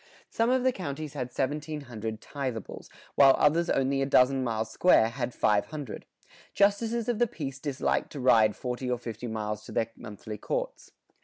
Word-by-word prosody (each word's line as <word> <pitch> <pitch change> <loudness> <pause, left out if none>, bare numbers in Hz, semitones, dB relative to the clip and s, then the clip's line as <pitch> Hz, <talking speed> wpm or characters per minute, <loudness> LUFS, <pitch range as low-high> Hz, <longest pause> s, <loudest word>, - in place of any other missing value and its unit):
Some 230 +1 +1
of 255 0 +2
the 260 - +4
counties 155 - -5
had 130 -4 -3
1,700 130 -5 -4
tithables, 130 -7 -6 0.2
while 135 -1 +7
others 165 +4 +3
only 135 0 +1
a 135 - +1
dozen 130 0 +4
miles 115 -2 -2
square 145 -11 +4
had 120 0 -3
500. 110 +5 -1 0.5
Justices 220 +3 +2
of 240 -3 0
the 240 - +4
peace 140 - -6
disliked 140 -2 -1
to 145 - -6
ride 110 -4 +4
forty 125 0 -4
or 125 - 0
fifty 120 0 -6
miles 105 -1 -4
to - - -10
their 115 0 -1
monthly 105 0 -8
courts. - - -4
135 Hz, 165 wpm, -28 LUFS, 115-155 Hz, 0.5 s, while